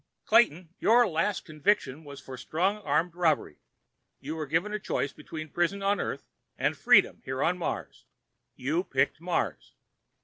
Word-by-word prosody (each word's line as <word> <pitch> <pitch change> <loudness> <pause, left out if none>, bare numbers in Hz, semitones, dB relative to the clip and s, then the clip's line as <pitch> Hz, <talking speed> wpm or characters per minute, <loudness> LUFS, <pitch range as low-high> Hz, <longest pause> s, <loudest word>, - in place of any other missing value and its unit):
"Clayton, 175 -6 +3
your 240 +1 +5
last 180 +3 -1
conviction 155 -2 0
was 140 -2 -10
for 130 - -9
strong 180 +10 0
arm 170 -2 0
robbery. 170 -4 0 0.6
You 145 +4 -5
were 155 -2 -4
given 170 +8 0
a 215 - -1
choice 145 -7 -2
between 155 +1 -8
prison 185 +3 0
on 200 +1 +2
Earth - - -4 0.3
and - - 0
freedom - - +4
here 130 +1 -2
on 180 +2 +1
Mars. - - -4 0.5
You 345 +3 -1
picked - - 0
Mars." - - -2
165 Hz, 150 wpm, -28 LUFS, 150-200 Hz, 0.6 s, your